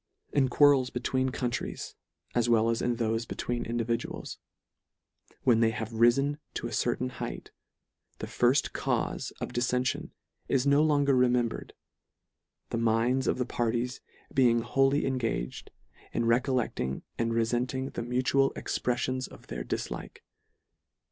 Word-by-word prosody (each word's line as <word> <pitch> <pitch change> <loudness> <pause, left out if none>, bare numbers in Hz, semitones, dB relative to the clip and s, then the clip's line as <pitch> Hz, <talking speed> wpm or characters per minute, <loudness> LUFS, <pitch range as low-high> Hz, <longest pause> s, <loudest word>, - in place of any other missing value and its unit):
In 135 -3 +3
quarrels 140 -1 +5
between 130 +1 0
countries, 125 -1 -3 0.4
as 120 -1 +2
well 115 0 +4
as 115 - -1
in 120 -1 0
thofe 115 0 -1
between 120 -1 -3
individuals, 115 0 -3 1.0
when 120 -4 +4
they 115 -1 +4
have 110 0 -4
rifen 120 +6 +3 0.2
to - - -3
a - - -4
certain 65 - 0
heighth, - - -6 0.7
the - - -5
firft 125 +4 +2
cause - - -1
of - - -3
diffention 125 +1 0 0.4
is 135 0 +1
no 140 +1 +5
longer 145 -3 +3
remembred, 125 -2 +1 1.0
the 115 - -1
minds 115 +3 +2
of - - +1
the 125 - 0
parties 120 +1 -1 0.3
being 120 -3 +4
wholly 135 +3 +2
engaged 115 - -2 0.4
in 115 - 0
re 115 +1 +5
collecting 120 - -2 0.2
and 115 0 0
refenting 125 +3 0
the - - -3
mutual 130 +3 +2
expref 125 -1 -1
fions 130 0 -2
of - - -14
their - - -5
dillike. - - -5
120 Hz, 135 wpm, -29 LUFS, 115-130 Hz, 1.0 s, quarrels